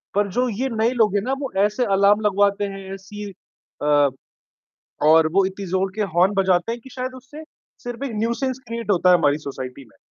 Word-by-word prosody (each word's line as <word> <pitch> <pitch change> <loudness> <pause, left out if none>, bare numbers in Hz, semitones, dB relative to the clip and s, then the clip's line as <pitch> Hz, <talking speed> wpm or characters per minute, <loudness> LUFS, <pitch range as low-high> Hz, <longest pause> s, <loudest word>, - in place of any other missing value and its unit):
पर 205 0 +2
जो 250 +1 +2
ये 250 +5 -2
नए 225 0 +1
लोग 220 -5 +2
है 205 - +2
ना 255 +5 -2
वो 275 - -4
ऐसे 210 +4 0
अलार्म 200 +2 +4
लगवाते 205 0 +2
हैं, 195 -1 -7
ऐसी 205 +2 -8 0.5
अ, 145 -1 +4 1.0
और 160 +1 +6
वो 195 +2 +4
इतनी 195 0 -6
ज़ोर 190 +2 0
के 215 - -1
हॉर्न 185 +4 +3
बजाते 190 +2 +2
हैं 235 - -6
कि 265 - -14
शायद 255 0 -5
उससे 265 +5 -11 0.4
सिर्फ 245 +2 -6
एक 265 - -4
न्यूसेंस 235 +4 -1
क्रिएट 230 -1 -4
होता 180 -1 +4
है 180 - +7
हमारी 145 -2 +2
सोसाइटी 135 -2 -7
में। - - -26
205 Hz, 200 wpm, -22 LUFS, 190-235 Hz, 1.0 s, है